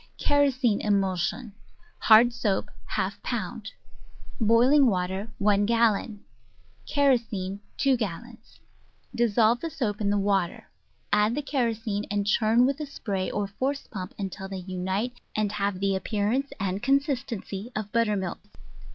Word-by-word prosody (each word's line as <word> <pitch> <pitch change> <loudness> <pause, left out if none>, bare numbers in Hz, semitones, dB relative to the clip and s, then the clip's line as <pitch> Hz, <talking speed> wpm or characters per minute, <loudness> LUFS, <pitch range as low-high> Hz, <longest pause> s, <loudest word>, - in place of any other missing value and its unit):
Kerosene 260 -6 +2
Emulsion 195 +2 0 0.5
Hard 235 +2 +6
Soap 200 -5 -1 0.3
1 - - +1
pound - - -4 0.7
Boiling 245 +5 +5
Water 190 +1 -1 0.2
i 205 -1 +5
gallon 215 0 +1 0.6
Kerosene 230 -9 +1 0.2
2 270 -2 +3
gallons 225 +3 -7 0.5
Dissolve 235 0 +3
the 330 - -4
soap 220 -8 -3
in 200 - +1
the 205 - +2
water; 195 -3 -1 0.4
add 210 +3 +3
the 295 - -2
kerosene, 225 -6 -1
and 205 0 -1
churn 220 +3 +3
with 275 +2 0
a 300 - -4
spray 195 -8 -3
or 205 - -1
force 265 +8 -3
pump 185 -4 -7
until 190 -1 -5
they 190 -2 -6
unite 190 +6 -3
and 215 -1 0
have 200 -2 -1
the 195 0 +1
appearance 215 +7 -1
and 195 0 -2
consistency 250 -6 -1
of 215 -1 -4
butter 230 -3 +2
milk. 190 -3 -3
215 Hz, 135 wpm, -26 LUFS, 195-245 Hz, 0.7 s, Hard